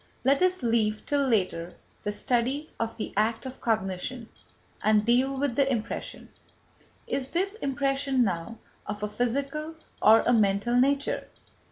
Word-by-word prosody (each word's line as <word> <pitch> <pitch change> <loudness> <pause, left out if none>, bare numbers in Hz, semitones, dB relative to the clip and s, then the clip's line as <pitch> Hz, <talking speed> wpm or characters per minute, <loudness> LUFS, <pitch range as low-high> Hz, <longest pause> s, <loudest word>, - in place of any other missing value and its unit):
Let 275 +3 +4
us 370 -4 +2
leave 220 -2 +1
till 285 -1 +1
later 185 -7 0 0.3
the 205 - -1
study 255 +7 -1
of 230 0 -3
the 220 - -5
act 220 +4 +1
of 260 0 -8
cognition, 220 +2 -2 0.5
and 215 -1 +3
deal 255 +3 +2
with 275 -3 -1
the 275 0 +2
impression. 225 -4 -4 0.8
Is 265 -1 -3
this 385 +3 0
impression 275 - 0
now 190 +2 -3 0.3
of 210 0 -5
a - - +1
physical 280 +8 -2 0.3
or 220 +1 +7
a 245 - +2
mental 205 +1 +2
nature? 275 +3 +1
245 Hz, 145 wpm, -27 LUFS, 215-275 Hz, 0.8 s, or